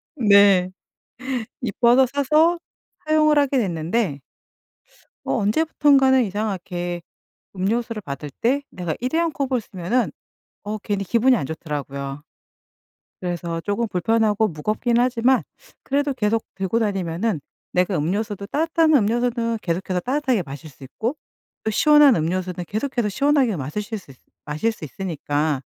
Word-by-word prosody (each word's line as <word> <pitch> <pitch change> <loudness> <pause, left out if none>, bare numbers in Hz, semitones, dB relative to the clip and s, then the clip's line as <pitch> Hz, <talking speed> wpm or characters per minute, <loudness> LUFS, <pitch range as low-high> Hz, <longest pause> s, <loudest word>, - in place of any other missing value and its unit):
네. 200 -6 +5 1.0
예뻐서 240 +3 +4
사서 300 +6 +2 0.5
사용을 305 -1 +4
하게 280 -1 +2
됐는데 175 - -1 1.0
어 - - -1
언제부턴가는 270 - +3
이상하게 185 -4 -3 0.5
음료수를 220 +4 -1
받을 145 -3 -7
때 270 +5 +2
내가 175 -3 -4
일회용 325 +7 0
컵을 265 -4 -1
쓰면은 205 +5 -1 0.5
어 210 +1 -3
괜히 200 -1 -2
기분이 240 +6 +3
안 180 - -2
좋더라고요. 140 -2 -5 1.0
그래서 170 -2 -3
조금 210 +4 -1
불편하고 220 +2 +2
무겁긴 215 +8 -1
하지만 250 +1 +3 0.4
그래도 280 0 0
계속 225 -2 0
들고 195 +3 -1
다니면은 195 -2 -1 0.3
내가 180 +1 +1
음료수도 200 +5 -2
따뜻한 320 +4 +2
음료수는 230 -1 +1
계속해서 180 +1 -1
따뜻하게 260 -2 0
마실 145 +2 -9
수 135 - -14
있고 230 - -3 0.5
또 220 - 0
시원한 295 +2 +6
음료수는 180 +2 -2
계속해서 235 +1 -1
시원하게 270 0 +2
마시실 210 - -4
수 165 -8 -15 0.3
마실 155 +9 -1
수 215 - -10
있으니까 150 -3 -2
210 Hz, 310 characters per minute, -22 LUFS, 175-255 Hz, 1.0 s, 시원한